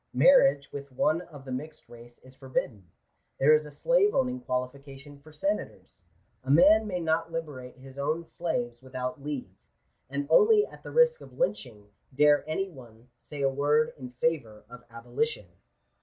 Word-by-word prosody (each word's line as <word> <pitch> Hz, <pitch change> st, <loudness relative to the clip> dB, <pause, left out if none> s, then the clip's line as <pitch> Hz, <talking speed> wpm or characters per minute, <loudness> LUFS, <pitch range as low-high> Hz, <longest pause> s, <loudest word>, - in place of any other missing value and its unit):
Marriage 140 Hz, -, +5 dB
with 140 Hz, -1 st, -8 dB
one 155 Hz, +6 st, +1 dB
of 145 Hz, -6 st, -13 dB
the 130 Hz, -, -7 dB
mixed 145 Hz, +5 st, -7 dB
race 120 Hz, 0 st, -15 dB
is 130 Hz, 0 st, -16 dB
forbidden; 130 Hz, -8 st, -4 dB, 0.5 s
there 145 Hz, +3 st, +6 dB
is 155 Hz, 0 st, +2 dB
a -, -, -9 dB
slave 415 Hz, -, +2 dB
owning 255 Hz, -1 st, 0 dB
qualification 135 Hz, -, -6 dB
for 155 Hz, +2 st, -17 dB
senators; 150 Hz, -, -4 dB, 0.4 s
a 130 Hz, -, -9 dB
man 200 Hz, +9 st, +6 dB
may 180 Hz, -3 st, -3 dB
not 165 Hz, 0 st, -1 dB
liberate 145 Hz, -7 st, -6 dB
his 135 Hz, +1 st, -13 dB
own 155 Hz, +4 st, -1 dB
slaves 120 Hz, -9 st, -4 dB
without 130 Hz, +1 st, -5 dB
leave; 135 Hz, -10 st, -6 dB, 0.5 s
and 140 Hz, +1 st, -3 dB
only 425 Hz, -, +6 dB
at -, -, -15 dB
the -, -, -9 dB
risk 485 Hz, 0 st, +3 dB
of -, -, -14 dB
lynching 115 Hz, -, -3 dB, 0.2 s
dare 145 Hz, +1 st, +4 dB
any 195 Hz, +5 st, -1 dB
one 120 Hz, -7 st, -15 dB
say 145 Hz, -2 st, -7 dB
a -, -, +4 dB
word 145 Hz, +3 st, +1 dB
in 130 Hz, -3 st, -9 dB
favour 125 Hz, -7 st, -2 dB
of 125 Hz, 0 st, -12 dB
abolition. 120 Hz, -, -3 dB
140 Hz, 165 wpm, -28 LUFS, 125-165 Hz, 0.5 s, there